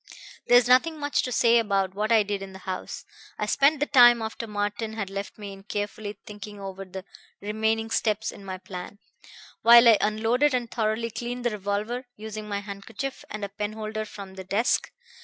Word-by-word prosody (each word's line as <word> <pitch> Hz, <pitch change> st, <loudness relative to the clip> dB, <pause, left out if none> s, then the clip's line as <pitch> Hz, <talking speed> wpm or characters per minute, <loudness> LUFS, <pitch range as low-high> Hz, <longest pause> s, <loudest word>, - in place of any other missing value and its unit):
"There's 245 Hz, 0 st, +6 dB
nothing 305 Hz, +6 st, +4 dB
much 290 Hz, 0 st, +1 dB
to 250 Hz, -, -4 dB
say 235 Hz, 0 st, +4 dB
about 195 Hz, -4 st, 0 dB
what 210 Hz, +3 st, -1 dB
I 220 Hz, -2 st, +6 dB
did 200 Hz, -1 st, -3 dB
in 195 Hz, -1 st, -8 dB
the -, -, -9 dB
house. 185 Hz, -1 st, -5 dB, 0.3 s
I -, -, -1 dB
spent 285 Hz, +2 st, +3 dB
the 295 Hz, -, +2 dB
time 240 Hz, -4 st, +7 dB
after 225 Hz, +1 st, -5 dB
Martin 210 Hz, +1 st, -3 dB
had 200 Hz, -3 st, -4 dB
left 200 Hz, 0 st, -5 dB
me 205 Hz, -2 st, -7 dB
in 195 Hz, -, -12 dB
carefully 205 Hz, +1 st, -5 dB
thinking 210 Hz, 0 st, -9 dB
over 195 Hz, 0 st, -7 dB
the 190 Hz, 0 st, -8 dB, 0.3 s
remaining 220 Hz, +2 st, -1 dB
steps 215 Hz, -1 st, 0 dB
in 200 Hz, -, -12 dB
my 190 Hz, -1 st, -5 dB
plan, 185 Hz, +1 st, -8 dB, 0.6 s
while 235 Hz, +1 st, +8 dB
I 225 Hz, -3 st, +7 dB
unloaded 230 Hz, +6 st, +2 dB
and 240 Hz, -2 st, -2 dB
thoroughly 225 Hz, 0 st, -1 dB
cleaned 240 Hz, +2 st, -5 dB
the 240 Hz, -, +2 dB
revolver, 210 Hz, +5 st, -3 dB
using 215 Hz, 0 st, -7 dB
my 200 Hz, 0 st, -2 dB
handkerchief 210 Hz, +7 st, -6 dB
and 215 Hz, -1 st, -4 dB
a -, -, -7 dB
penholder 215 Hz, +1 st, -4 dB
from 200 Hz, -2 st, -10 dB
the 190 Hz, 0 st, -8 dB
desk. 205 Hz, +6 st, 0 dB
215 Hz, 190 wpm, -26 LUFS, 200-235 Hz, 0.6 s, while